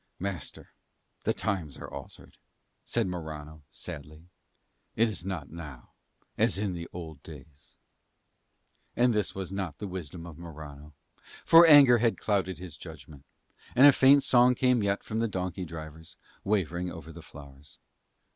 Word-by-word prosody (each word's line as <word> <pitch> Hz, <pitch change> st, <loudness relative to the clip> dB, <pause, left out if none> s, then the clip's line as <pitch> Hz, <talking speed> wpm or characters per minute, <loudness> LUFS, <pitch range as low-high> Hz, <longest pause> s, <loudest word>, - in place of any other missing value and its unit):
"Master, 95 Hz, -4 st, -6 dB, 0.5 s
the -, -, +3 dB
times 85 Hz, -9 st, -3 dB
are -, -, -8 dB
altered," -, -, -11 dB, 0.4 s
said 115 Hz, -2 st, -1 dB
Morano 80 Hz, -4 st, -7 dB
sadly. 75 Hz, +3 st, -10 dB, 0.7 s
"It 115 Hz, +1 st, +3 dB
is 105 Hz, -6 st, -5 dB
not 90 Hz, -7 st, -5 dB
now 75 Hz, -7 st, -10 dB, 0.5 s
as -, -, +2 dB
in 90 Hz, -5 st, -3 dB
old 80 Hz, -4 st, -9 dB
days." 75 Hz, -2 st, -14 dB, 1.2 s
And 120 Hz, 0 st, +3 dB
this 105 Hz, -3 st, -1 dB
was 95 Hz, -2 st, -5 dB
not 95 Hz, -5 st, -4 dB
the 105 Hz, -, -6 dB
wisdom 90 Hz, -3 st, -7 dB
of 85 Hz, -2 st, -11 dB
Morano, 75 Hz, -3 st, -11 dB, 0.5 s
for 165 Hz, +1 st, +8 dB
anger 140 Hz, -6 st, +8 dB
had 115 Hz, 0 st, +1 dB
clouded 95 Hz, -3 st, -1 dB
his 90 Hz, -6 st, -10 dB
judgment. 75 Hz, -3 st, -12 dB, 0.5 s
And 130 Hz, -, +7 dB
a 145 Hz, -, +10 dB
faint 135 Hz, +1 st, +5 dB
song 125 Hz, 0 st, +5 dB
came 125 Hz, -1 st, +2 dB
yet 100 Hz, 0 st, -1 dB
from 110 Hz, 0 st, -3 dB
the 115 Hz, -, +1 dB
donkey 90 Hz, -2 st, -4 dB
drivers, 80 Hz, -1 st, -10 dB, 0.3 s
wavering 90 Hz, -3 st, -1 dB
over 80 Hz, -1 st, -9 dB
the -, -, -11 dB
flowers. 70 Hz, 0 st, -14 dB
90 Hz, 145 wpm, -28 LUFS, 80-105 Hz, 1.2 s, a